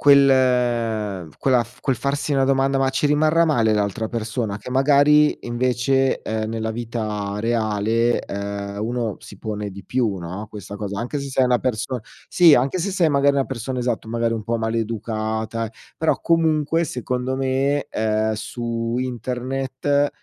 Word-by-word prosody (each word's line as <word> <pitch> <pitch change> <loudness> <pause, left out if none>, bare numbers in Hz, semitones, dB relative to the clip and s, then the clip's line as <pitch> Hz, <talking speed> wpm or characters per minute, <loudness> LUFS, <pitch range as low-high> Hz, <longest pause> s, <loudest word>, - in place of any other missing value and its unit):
quel 120 - +3
quella 125 -3 +3 0.2
quel 135 - +1
farsi 140 +4 -2
una 135 -1 +3
domanda: 135 0 +2
"Ma 135 0 +2
ci 135 +2 -1
rimarrà 155 +3 +4
male 115 -9 +2
l'altra 105 +2 -1
persona?". 110 -2 -3
Che 105 +5 -9
magari 145 +3 +4
invece, 130 +2 +1
ehm, 110 0 -2
nella 110 0 -2
vita 110 -3 -3
reale, 115 +1 +1
ehm, 100 0 -5
uno 115 -2 -2
si 100 - -12
pone 105 0 -4
di 100 -1 -10
più, 115 -5 0
no, 95 +4 -6
questa 100 -2 -9
cosa 100 -1 -4
anche 125 +5 -3
se 140 - -5
sei 130 -1 +2
una 125 -1 +3
person 125 0 -2 0.3
sì 170 -4 +7
anche 135 +7 +1
se 195 +3 -1
sei 170 -5 +2
magari 140 0 +3
una 135 - +2
persona 130 0 -4
esatto, 120 -2 -2
magari 115 0 0
un 115 - -3
po' 115 +2 -1
maleducata, 110 0 -2
eh 110 - -10 0.3
però 160 - +1
comunque 165 0 +2
secondo 125 -2 -3
me, 135 +2 0
ehm, 110 0 0
su 115 +1 -3
internet 130 +3 -1
120 Hz, 155 wpm, -22 LUFS, 110-135 Hz, 0.3 s, sì